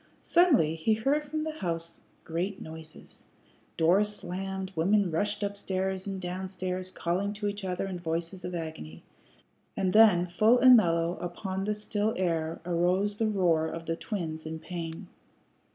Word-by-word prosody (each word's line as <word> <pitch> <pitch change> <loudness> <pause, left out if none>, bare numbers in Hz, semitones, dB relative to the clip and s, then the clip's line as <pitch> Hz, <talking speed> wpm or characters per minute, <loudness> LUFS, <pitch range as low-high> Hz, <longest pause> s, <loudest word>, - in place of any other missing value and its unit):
Suddenly 295 - +4
he 215 +7 +2
heard 275 +7 +1
from 310 +1 -3
the 315 - -2
house 165 -1 -4 0.2
great 180 +4 -3
noises. 160 0 -11 0.5
Doors 185 +6 +4
slammed, 190 +1 -5
women 190 +3 +2
rushed 205 +5 -1
up 200 0 -2
stairs 190 -1 -2
and 195 -1 -3
down 185 +1 -4
stairs 185 0 -4
calling 185 +3 -1
to 210 0 -3
each 205 0 -4
other 185 0 -2
in 185 -2 -5
voices 170 +2 -3
of 180 0 -4
agony. 155 - -7 0.7
And 185 -1 +1
then 210 -5 +6
full 215 +7 +4
and 255 0 +8
mellow 170 -4 +2
upon 190 +2 -4
the 210 0 0
still 210 +1 -1
air 165 -3 -1
arose 180 +4 +1
the 225 - +2
roar 175 -6 +2
of 165 0 -6
the 165 - -1
twins 165 -5 -4
in 160 0 -5
pain. 165 0 -6
185 Hz, 160 wpm, -29 LUFS, 165-205 Hz, 0.7 s, and